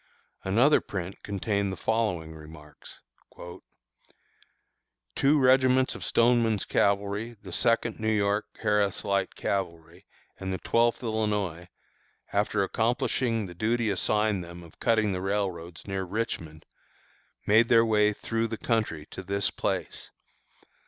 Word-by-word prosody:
Another 120 +10 +4
print 95 0 -6
contained 100 0 -1
the 95 - -5
following 90 -7 -1
remarks: 75 -1 -13 2.1
Two 145 +3 +4
regiments 130 0 +4
of - - -8
Stoneman's 115 -3 +2
Cavalry, 100 +3 0
the 95 - -9
Second 115 +4 +1
New 110 0 0
York 105 0 +1 0.2
(Harris 105 -2 +1
Light 100 -1 0
Cavalry) 85 -5 -4 0.3
and 95 0 -4
the 95 - -2
Twelfth 115 +4 +1
Illinois, 105 -6 -1 0.7
after 100 0 +1
accomplishing 115 +1 0
the 90 - -9
duty 110 +4 0
assigned 105 0 +1
them 85 0 -10
of 85 - -17
cutting 110 -3 +2
the 90 -1 -3
railroads 95 -4 -3
near 95 -1 -3
Richmond, 90 -6 -4 0.8
made 110 +3 +5
their 115 -1 +6
way 105 -1 +3
through 115 +2 -2
the 110 0 -5
country 105 -12 -1
to - - -6
this 100 +1 -1
place. - - -3
105 Hz, 125 wpm, -27 LUFS, 95-115 Hz, 2.1 s, their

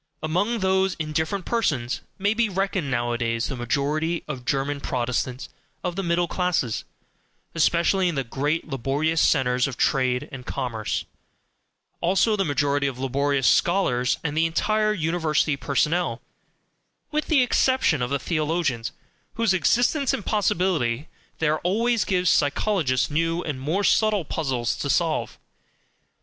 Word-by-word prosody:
Among 200 +8 0
those 190 0 +2
indifferent 160 +4 -2
persons 140 - -1 0.2
may 205 +2 +1
be 225 -1 +1
reckoned 190 -5 -1
nowadays 120 -2 -1
the 135 - -3
majority 150 +7 -1
of 130 -5 -6
German 140 +1 -1
Protestants 125 +1 -2 0.4
of 180 -1 -2
the 195 - -1
middle 175 -1 +1
classes, 175 - -1 0.7
especially 170 +3 +2
in 170 - -3
the 135 - 0
great 145 +7 -2
laborious 145 +4 0
centres 125 -3 +2
of 135 -1 -6
trade 130 -3 +1
and 130 -3 -8
commerce; 120 -5 -3 0.9
also 195 +5 +2
the 195 - +1
majority 145 -2 +1
of 130 -2 -4
laborious 135 +1 0
scholars, 130 -9 +2
and 150 -2 -2
the 165 +1 +3
entire 215 +6 +1
University 160 -5 0
personnel 140 -1 0 0.9
(with 305 0 -1
the 290 -6 +4
exception 250 - +2
of 125 - -1
the 140 - +1
theologians, 155 -7 -1 0.4
whose 230 -4 +2
existence 245 - +2
and 205 - -7
possibility 170 - 0 0.3
there 155 -1 +1
always 230 +5 +1
gives 180 -2 0
psychologists 145 - +1
new 165 +3 0
and 140 -4 -4
more 165 +9 0
subtle 210 -4 +3
puzzles 130 -7 -1
to - - -3
solve). - - 0
155 Hz, 135 wpm, -24 LUFS, 135-190 Hz, 0.9 s, the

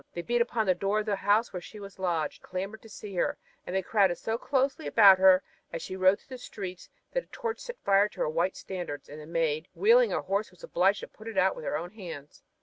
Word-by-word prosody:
They 175 - -3
beat 240 +3 +1
upon 235 -2 0
the 185 - +4
door 195 +4 0
of - - -7
the 210 -2 0
house 205 +4 +2
where 180 - -4
she 210 +4 -11
was 200 -1 -11
lodged 170 -5 -1
and - - -18
clamored 195 +4 -4
to 225 - -14
see 205 -1 -9
her, - - +1 0.3
and 180 - -3
they 190 - +1
crowded 195 -3 +3
so 225 - -2
closely 275 +5 0
about 195 -4 +7
her 190 0 +6 0.3
as 165 - -5
she 185 - -5
rode 190 +1 +4
through 260 - -10
the - - -17
streets 185 -6 -7 0.2
that - - -1
a - - -36
torch 460 -2 -4
set 485 -1 -7
fire 200 +1 +4
to - - -8
her - - +1
white 170 +4 0
standard, 175 -6 -6
and 150 +1 -9
the 150 - -11
Maid, 165 -1 0
wheeling 470 +3 +5
her - - -1
horse, 200 +3 -1
was 180 - -21
obliged 195 +3 +2
to - - -7
put 220 - -14
it 225 -3 -6
out 190 0 +3
with 155 - -8
her - - -1
own 175 +3 -6
hands. 165 -9 -9
195 Hz, 260 wpm, -29 LUFS, 180-220 Hz, 0.3 s, about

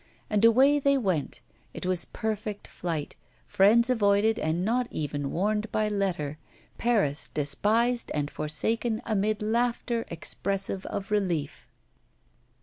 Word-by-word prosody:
And 210 0 +2
away 265 +6 +6
they 280 0 +3
went; 185 - -2 0.3
it - - -6
was 185 -1 +1
perfect 215 -1 -4
flight, 165 -4 -4 0.3
friends 225 +5 +4
avoided 215 -2 +2
and 160 +4 -1
not 245 +3 +1
even 145 -2 -3
warned 210 +6 -1
by 215 0 +1
letter, 175 -8 -2 0.4
Paris 205 -12 +1
despised 220 - +1
and 145 0 -1
forsaken 220 +9 0
amid 215 -1 0
laughter 235 +1 0
expressive 195 +3 -2
of 195 +1 -5
relief. 175 -8 -1
205 Hz, 120 wpm, -27 LUFS, 170-230 Hz, 0.4 s, away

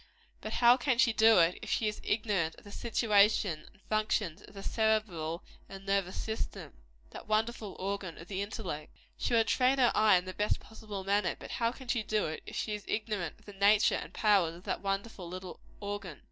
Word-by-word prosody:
But - - -5
how 240 +1 +6
can 260 -1 +1
she 235 -2 +4
do 220 0 +6
it, 170 0 +4
if - - -7
she 220 - +1
is 210 - -3
ignorant 205 -7 0
of - - -17
the 205 - -12
situation 205 -7 +2
and 205 - -25
functions 215 -5 0
of - - -16
the 195 - -8
cerebral 200 -8 0 0.3
and 195 0 -10
nervous 195 -2 0
system 220 0 -4 0.4
that - - -10
wonderful 215 -1 -1
organ 195 -2 -4
of 165 - -11
the 195 0 -3
intellect? 190 -7 -5 0.2
She 240 - 0
would 225 -1 +4
train 260 +1 +3
her 250 -3 +4
eye 215 -3 +5
in 180 - -3
the 185 - -6
best 210 +3 0
possible 210 -3 -8
manner; 200 +2 +1
but - - -9
how 230 0 0
can 260 +1 -12
she 235 -1 +1
do 210 -6 -1
so, - - -5
if - - -7
she 215 - -2
is 210 -1 -5
ignorant 210 -6 -2
of - - -24
the 205 - -10
nature 200 +2 +4
and - - -3
powers 195 -6 +3
of 175 - -13
that - - -3
wonderful 195 -2 -3
little 185 0 -7 0.2
organ? 200 -6 -5
205 Hz, 210 wpm, -31 LUFS, 185-220 Hz, 0.4 s, how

